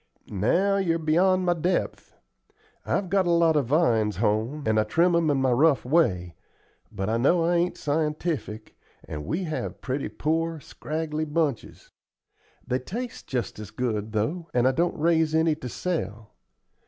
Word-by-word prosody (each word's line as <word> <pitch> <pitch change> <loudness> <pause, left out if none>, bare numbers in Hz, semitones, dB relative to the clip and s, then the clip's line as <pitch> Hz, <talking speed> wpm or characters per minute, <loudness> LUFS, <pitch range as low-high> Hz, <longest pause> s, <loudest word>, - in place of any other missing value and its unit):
"Now, 175 - +2
you're 170 -4 +1
beyond 180 +4 +2
my 175 - +3
depth. 175 +2 -2 0.7
I've 195 - 0
got 190 0 +1
a - - +1
lot 170 -2 +4
of 145 -5 +1
vines 115 - +2
home, 110 - 0
and 110 0 +2
I - - +3
trim 170 +10 +2
'em 165 -2 +2
in 145 - +2
my 130 -1 +2
rough 140 +2 +3
way, 100 - +1 0.6
but 95 - -4
I 110 +1 +1
know 165 +8 +3
I 175 +1 +2
ain't 175 +1 0
scientific, 150 -6 -2 0.3
and 75 -1 -6
we 185 - -1
have 155 -3 -4
pretty 135 +2 -3
poor, 165 +1 -1
scraggly 155 +1 -4
bunches. 150 -5 -3 0.7
They 125 0 -1
taste 230 - -6
just 125 -4 -3
as 105 -2 -7
good, 110 -3 -3
though, 150 +11 -2
and 125 +1 +4
I - - +4
don't 170 +6 0
raise 160 0 +2
any 160 0 +3
to 130 -5 -7
sell. 115 - -4
155 Hz, 165 wpm, -26 LUFS, 120-170 Hz, 0.7 s, lot